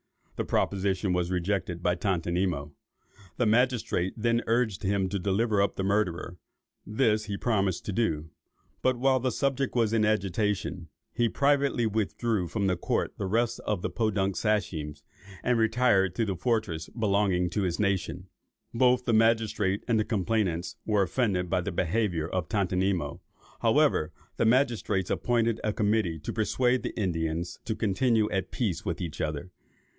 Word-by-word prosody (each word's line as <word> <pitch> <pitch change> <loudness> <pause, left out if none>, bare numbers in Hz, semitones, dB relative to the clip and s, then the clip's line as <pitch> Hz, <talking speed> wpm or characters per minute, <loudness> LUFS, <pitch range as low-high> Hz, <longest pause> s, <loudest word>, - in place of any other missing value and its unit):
The - - -1
proposition 95 -1 0
was 90 -1 0
rejected 90 -1 -2
by 90 - +3
Tontonimo. 90 -5 -1 0.7
The 125 - +2
magistrates 115 -5 +1
then 115 +1 +1
urged 115 -4 +1
him 95 -1 +1
to 100 +1 -2
deliver 100 +3 +1
up 100 - +1
the 95 - -2
murderer: 95 -3 -1 0.5
this 110 -1 +1
he 100 -2 -4
promised 100 -7 0
to - - -2
do. 80 -8 -1 0.5
But 130 -1 +2
while 130 +1 +3
the 130 +1 0
subject 135 +2 -1
was 115 -2 +2
in 110 -1 +3
agitation, 105 -4 -1 0.2
he 120 -1 +1
privately 140 -3 +2
withdrew 110 -2 -1
from 100 +2 -2
the 95 -1 +2
court 85 - -1
with - - -41
the - - -1
rest 115 +4 0
of 105 -4 -2
the - - -2
Podunk 100 -4 0
Sachems, 85 -9 -1 0.4
and 125 -2 +2
retired 110 -5 +3
to 115 - +1
the 100 -3 -2
fortress 90 -6 -1
belonging 100 -5 +1
to 105 - -1
his 90 -3 -1
nation. 95 -2 -1 0.5
Both 125 +1 +3
the 120 - +1
magistrates 110 -3 +2
and 115 -3 +2
the - - +2
complainants 95 -5 -1
were 105 -2 +2
offended 95 -3 0
at 90 -1 +1
this 100 - -4
behaviour 90 -3 0
of 90 -3 -3
Tontonimo. 95 -5 0 0.4
However, 75 - +3 0.3
the - - +2
magistrates 115 -6 +1
appointed 115 -2 +1
a 110 - +1
committee 105 -6 +1
to 75 - -6
persuade 125 +3 +1
the - - -5
Indians 85 -3 -2
to 110 - -2
continue 110 +2 +2
at 95 -2 -1
peace 100 -10 -2
with 85 -5 -3
each 85 -4 -5
other. 75 +4 -3
100 Hz, 160 wpm, -28 LUFS, 90-115 Hz, 0.7 s, by